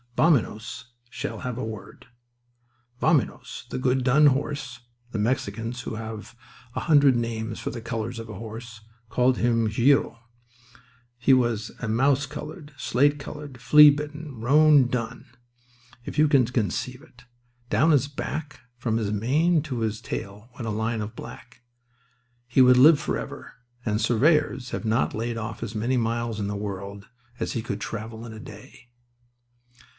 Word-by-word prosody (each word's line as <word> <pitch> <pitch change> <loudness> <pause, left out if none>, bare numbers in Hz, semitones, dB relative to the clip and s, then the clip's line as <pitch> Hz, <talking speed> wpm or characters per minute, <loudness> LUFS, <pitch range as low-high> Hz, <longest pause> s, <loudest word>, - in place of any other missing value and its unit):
Vaminos 125 -5 +1 0.2
shall - - -5
have 125 -3 -4
a 125 - -3
word—Vaminos 120 +4 -4
the - - -4
good 130 0 +1
dun 135 +4 +5
horse. 135 -2 -1 0.3
The 110 - -3
Mexicans, 115 +1 -2
who 110 - -5
have 110 0 -7 0.4
a - - -2
hundred 145 -5 +5
names 115 -1 -3
for - - -4
the 115 0 -6
colours 115 0 -4
of 115 - -7
a 105 - -7
horse, 110 +1 -9 0.3
called 125 +2 +2
him 115 -2 +2
gruyo. 120 +4 +2 1.0
He 125 +2 +4
was 120 -4 +1
a 115 - -4
mouse 135 +5 +2
coloured, 150 +2 -8
slate 145 +4 +2
coloured, 145 -3 -8
flea 150 +5 +8
bitten 145 -2 -4
roan 145 +1 +5
dun, 125 0 -4 0.8
if - - -7
you 155 - +6
can 140 -4 +4
conceive 120 +1 -2
it. 120 0 -19 0.5
Down 160 - +3
his 140 -2 +3
back 145 +1 -5 0.2
from 115 -2 -1
his 105 -3 -1
mane 150 - +2
to 130 -6 -4
his 110 -1 -2
tail 105 +1 -6
went 120 -2 -6
a - - -1
line 110 +1 -1
of 105 +1 -6
black. 125 0 -11 0.9
He 125 +2 +3
would 125 0 +7
live 145 +3 +7
forever; 150 - -5 0.3
and 105 -2 0
surveyors 130 0 +2
have - - -4
not 110 +3 +1
laid 115 +1 -3
off 115 0 -5
as 115 - -5
many 120 +4 0
miles 115 -1 -1
in 100 - -2
the 100 - -3
world 100 0 -6 0.3
as - - -2
he 115 - -2
could 105 -3 -4
travel 110 0 -6
in 115 - -8
a 110 - -9
day. 130 0 -13
120 Hz, 155 wpm, -25 LUFS, 110-135 Hz, 1.0 s, flea